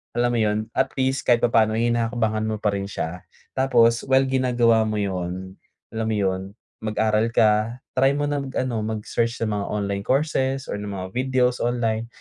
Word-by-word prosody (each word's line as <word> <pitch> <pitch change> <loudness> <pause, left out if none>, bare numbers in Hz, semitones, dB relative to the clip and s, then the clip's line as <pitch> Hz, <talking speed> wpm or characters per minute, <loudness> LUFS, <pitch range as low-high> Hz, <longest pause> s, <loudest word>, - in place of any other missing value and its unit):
alam 120 0 +2
mo, - - +1
yon? 110 0 0
At 135 +2 -1
least 130 0 0
kahit 120 -1 +5
papaano 110 -2 +3
hinahakbangan 115 -1 0
mo 110 - -1
pa 105 -1 +1
rin 100 0 -3
siya, 90 -2 -5 0.3
tapos 115 -3 +3
well, 135 0 +4
ginagawa 120 -4 +3
mo 110 - -2
yon, 95 -1 -4 0.4
alam 110 0 -2
mo - - 0
yon, 95 -2 0 0.4
mag-aral 110 0 +1
ka, 110 +3 +2 0.2
try 135 +1 +4
mo 145 - -1
na 145 0 -1
mag-ano 130 -3 -2
mag-search 110 +2 -2
sa - - -1
mga 105 -1 -2
online 100 -1 -2
courses 135 -1 0
or - - -2
ng 105 0 -5
mga 95 -1 -5
videos 125 -1 +1
online, 115 -2 0
115 Hz, 175 wpm, -23 LUFS, 105-125 Hz, 0.4 s, kahit